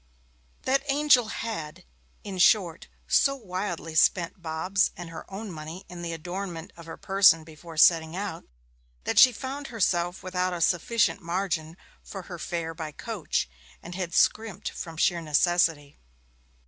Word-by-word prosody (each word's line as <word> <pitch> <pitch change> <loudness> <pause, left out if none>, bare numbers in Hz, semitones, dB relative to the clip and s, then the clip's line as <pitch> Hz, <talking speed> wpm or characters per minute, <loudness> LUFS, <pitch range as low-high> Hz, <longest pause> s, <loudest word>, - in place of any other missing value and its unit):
That 270 +1 +2
angel 275 -4 +4
had, 180 -7 -5 0.4
in 195 -3 -6
short, 180 -3 +3 0.2
so 275 -1 +3
wildly 185 -7 -5
spent 170 +2 +2
Bob's 170 +5 0
and 175 -2 -8
her 165 - -10
own 200 +1 -6
money 160 +3 -8
in 175 -1 -8
the 170 -1 -4
adornment 175 0 -6
of 170 -1 -13
her 165 - -8
person 190 -4 +5
before 160 +1 -12
setting 160 0 +5
out, 195 -4 -5 0.6
that - - +2
she 255 - +9
found 270 +4 -6
herself 180 -6 0
without 185 0 -1
a 175 - -4
sufficient 200 +4 +2
margin 170 -2 -2 0.3
for 195 -2 -8
her 175 -1 -9
fare 165 0 -3
by 160 -2 -6
coach, 165 - -3 0.4
and 175 - -8
had 180 -2 -4
scrimped 215 -3 +1
from 165 -1 -8
sheer 170 +1 +2
necessity. 160 -1 +1
175 Hz, 150 wpm, -27 LUFS, 165-200 Hz, 0.6 s, she